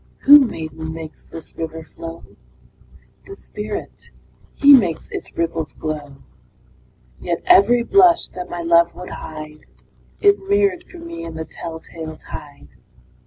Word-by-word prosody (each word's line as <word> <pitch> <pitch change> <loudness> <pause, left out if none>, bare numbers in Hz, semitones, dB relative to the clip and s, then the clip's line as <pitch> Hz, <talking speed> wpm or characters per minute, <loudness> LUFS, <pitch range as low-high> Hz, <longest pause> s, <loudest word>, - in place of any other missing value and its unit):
II. - - -33 0.2
Who, 290 +1 +11
maiden, 160 - -3
makes 160 -1 -10
this 165 - -8
river 160 0 -5
flow? 165 +1 -10 1.0
The 395 - -9
Spirit - - -7 0.5
he 285 0 +7
makes 200 - +3
its - - -7
ripples 165 -2 -2
glow 150 -3 -5 1.0
Yet 170 -1 -3
every 235 +4 +5
blush 360 +3 +5
that 180 -1 -8
my 175 -1 -5
love 170 0 +4
would 180 - -9
hide, 155 -1 -9 0.5
Is 405 0 +4
mirror'd 395 -2 +1
for 360 - -12
me 335 - -8
in 165 -1 -7
the 160 0 -5
tell 165 -1 -8
tale 160 -1 -9
tide. 145 -1 -11
170 Hz, 140 wpm, -20 LUFS, -, 1.0 s, Who